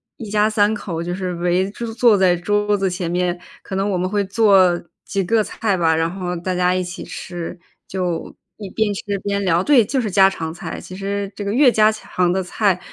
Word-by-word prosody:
一 220 -3 -8
家 210 0 +3
三 215 0 +2
口 170 -6 -4
就 175 +1 -3
是 185 -1 -3
围 180 +2 0
着 230 0 -6
坐 230 -3 +4
在 180 -2 +3
桌 205 +3 +1
子 195 -1 0
前 175 -1 -3
面， 180 0 0 0.3
可 190 - -6
能 195 +2 0
我 185 - 0
们 185 +1 -1
会 205 0 0
做 190 -4 +4 0.2
几 195 - -2
个 220 +3 +2
菜 210 -2 -1
吧， 165 -3 +2
然 165 +1 +1
后 180 -1 -4
大 180 +1 -3
家 180 0 +2
一 185 - 0
起 180 +2 -6
吃， 175 -2 -7 0.3
就 180 -3 -3 0.2
一 200 -3 -8
边 220 +1 0
吃 200 0 -4
边 200 0 -1
聊， 175 -1 +2
对， 260 -1 +5
就 260 +6 -1
是 220 -4 -1
家 195 0 +5
常 160 -4 -5
菜， 175 - -7
其 185 - -10
实 200 0 -3
这 205 - -5
个 200 - -2
越 260 +1 +6
家 215 -2 +4
常 180 -4 -1
的 190 - 0
菜 185 0 0
190 Hz, 240 characters per minute, -20 LUFS, 180-210 Hz, 0.3 s, 越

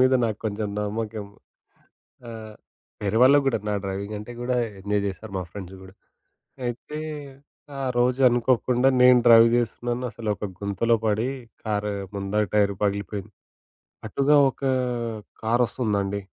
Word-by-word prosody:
మీద 130 +1 +5
నాకు 110 -3 -2
కొంచెం 105 0 -2
నమ్మకం. 105 0 -3 1.0
ఆ! - - -6 0.7
వేరే 105 +2 +1
వాళ్ళకి 140 +2 +6
గూడా. 130 -4 +2
నా - - 0
డ్రైవింగ్ 100 +2 -4
అంటే 105 +4 -8
కూడా 125 +1 -1 0.2
ఎంజాయ్ 100 +1 0
చేస్తారు 100 +2 -6
మా 90 - -2
ఫ్రెండ్స్ 95 -2 -8
గూడా. 95 0 -14 0.7
అయితే, 120 +5 -5 0.8
ఆ - - -4 0.2
రోజు 125 +2 +2
అనుకోకుండా 125 +1 +2
నేను 125 0 +8
డ్రైవ్ 115 0 +8
జేస్తున్నాను. 120 +1 -1
అసలొక 110 -2 -3 0.2
గుంతలో 100 +4 +1
పడి, 110 +4 +1 0.4
కార్ 105 -1 -1 0.2
ముందర 100 +1 0
టైరు 100 -2 +3
పగిలిపోయింది. 100 -1 -2 0.8
అటుగా 145 +2 +3
ఒకా 135 0 -2 0.7
కారొస్తుందండి. 110 -4 0
110 Hz, 125 wpm, -25 LUFS, 100-120 Hz, 1.0 s, నేను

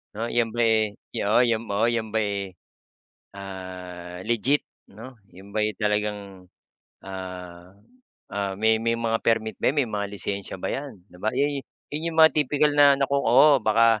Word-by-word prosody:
Oh, 115 +2 -2
yan 115 -2 0
ba, 120 - -6
eh, 110 -2 +3 0.2
yu - - -1
oh 105 +3 +3
yom 115 -3 +1
oo, 105 +3 +2
yan 115 -2 -1
ba, 110 - +1
eh, 100 -2 -2 0.8
ah, 90 -2 -8
legit 120 +5 +2 0.3
'no? 115 +6 -11 0.2
'Yon 95 +3 -14
ba, 110 - +2
eh, 105 - 0
talagang 105 -3 -2 0.6
ah 90 -1 -8 0.6
ah, 100 -1 -2
may 110 +2 +2
may 115 0 0
mga 115 -1 -1
permit 115 -1 0
ba - - +3
yan, 140 - -1
may - - -8
mga 105 -1 -2
lisensiya 100 -1 -4
ba 90 - -4
yan? 135 -10 -6
'Di 90 - -17
ba 110 - 0
iya'y 140 +1 +1 0.3
yun 155 +3 -2
yung - - -8
mga 160 0 +8
tipikal 150 0 +2
na 145 -1 +6
naku 140 0 -1
oo 135 +3 +5
baka 115 0 +4
110 Hz, 180 wpm, -25 LUFS, 100-120 Hz, 0.8 s, mga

